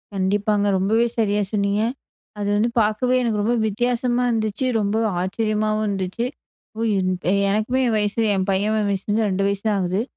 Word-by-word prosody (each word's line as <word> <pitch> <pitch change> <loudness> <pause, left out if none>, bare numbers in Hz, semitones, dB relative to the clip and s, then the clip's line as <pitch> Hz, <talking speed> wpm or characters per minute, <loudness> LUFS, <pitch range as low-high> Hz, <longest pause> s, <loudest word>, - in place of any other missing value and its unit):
கண்டிப்பாங்க. 205 +2 +1
ரொம்பவே 220 +5 +2
சரியாக 210 -2 +1
சொன்னீங்க. 200 0 +1 0.6
அது 205 - -2
வந்து 215 +3 +2
பார்க்கவே 215 +4 +1
எனக்கு 220 -4 0
ரொம்ப 230 +4 +1
வித்தியாசமா 245 +3 0
இருந்துச்சு. 220 +1 -1
ரொம்ப 205 0 0 0.3
ஆச்சரியமாவும் 215 +2 -1
இருந்துச்சு. 195 +3 -2 0.5
ஒ - - -2
யு 195 - +1 0.5
எனக்குமே 215 +5 0
என் 225 - +1
வயசு 210 +2 0
என் 190 0 -1
பையன் 205 +3 +1
வயசுல 195 +1 -3
வந்து 220 0 +2
ரெண்டு 195 +1 0
வயசு 200 0 -2
தான் 210 -2 +2
ஆகுது. 185 +2 0
210 Hz, 160 wpm, -22 LUFS, 200-225 Hz, 0.6 s, ரொம்பவே